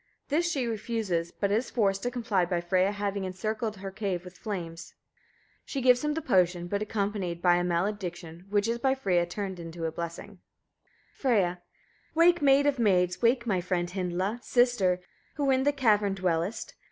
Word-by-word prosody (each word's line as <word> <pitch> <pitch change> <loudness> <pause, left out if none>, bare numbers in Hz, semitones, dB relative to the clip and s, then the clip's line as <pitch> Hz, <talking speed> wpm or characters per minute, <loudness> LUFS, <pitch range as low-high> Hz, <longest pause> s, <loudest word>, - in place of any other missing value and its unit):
This 335 +4 +1
she 270 -6 -1
refuses, 215 -7 -2
but 200 -1 -1
is 225 +5 +1
forced 195 -4 +1
to 245 - -1
comply 230 -6 0
by 175 0 0
Freyia 185 +3 +2
having 200 -1 -2
encircled 215 +4 -3
her 195 0 -6
cave 190 -3 -3
with 180 +1 -11
flames. 170 -6 -6 0.7
She 275 - -4
gives 250 0 +4
him 300 0 0
the 320 - -3
potion, 180 -7 +2
but 200 +3 -2
accompanied 200 -5 -2
by 175 0 +4
a 175 - 0
malediction, 175 -1 -3
which 205 +1 +1
is 235 +1 -1
by 265 +1 +2
Freyia 180 -9 +1
turned 180 -3 -5
to 165 -1 -4
a 160 - -1
blessing. 170 +4 -7 0.7
Freyia. 195 -9 +1 0.6
1. 335 +1 +5
Wake, 345 -2 +4
maid 280 0 +5
of 285 -3 +1
maids! 180 -5 +2
Wake, 235 0 +3
my 190 -6 +1
friend! 175 -1 -1
Hyndla! 185 +4 -2
Sister! 225 -9 +2 0.3
who 280 -2 +1
in 265 0 +2
the 290 - +4
cavern 210 -8 +2
dwellest. 180 +3 -1
200 Hz, 175 wpm, -28 LUFS, 180-235 Hz, 0.7 s, 1